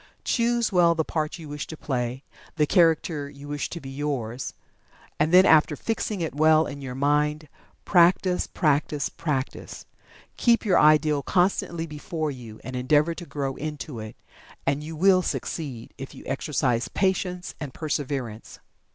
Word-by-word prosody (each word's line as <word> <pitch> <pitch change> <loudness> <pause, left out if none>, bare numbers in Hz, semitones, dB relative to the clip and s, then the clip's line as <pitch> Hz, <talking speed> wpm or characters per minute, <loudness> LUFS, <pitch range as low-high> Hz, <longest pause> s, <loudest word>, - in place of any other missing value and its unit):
Choose 235 -1 +1
well 175 -3 +4
the 160 -1 0
part 155 0 -2
you 160 -3 -10
wish 145 0 -5
to 160 - -8
play 125 -1 -3 0.3
the 155 -2 +3
character 160 -2 +2
you 140 0 -12
wish 145 0 -3
to 170 - -6
be 135 -4 -9
yours 135 -4 -3 0.6
and 155 +2 +2
then 185 +1 +8
after 155 -3 +5
fixing 215 0 -2
it 160 - -2
well 155 +2 +4
in 140 -1 -7
your 130 -2 -6
mind, 150 +2 +1 0.4
practice, 180 0 +3
practice, 150 -2 0
practice. 145 -5 -4 0.5
Keep 235 -1 +3
your 190 -4 +4
ideal 150 -1 +4
constantly 175 -1 0
before 155 0 -4
you, 115 -5 -10
and 130 - -6
endeavor 150 +6 +2
to 175 0 -9
grow 135 -2 -3
into 150 -4 -5
it. 110 0 -8 0.5
And 140 +2 0
you 160 +1 -7
will 185 +3 +5
succeed, 135 -9 -4
if 135 - -8
you - - -11
exercise 135 -3 0
patience 180 +1 -1
and 150 -4 -5
perseverance. 135 -7 -4
150 Hz, 155 wpm, -25 LUFS, 140-170 Hz, 0.6 s, then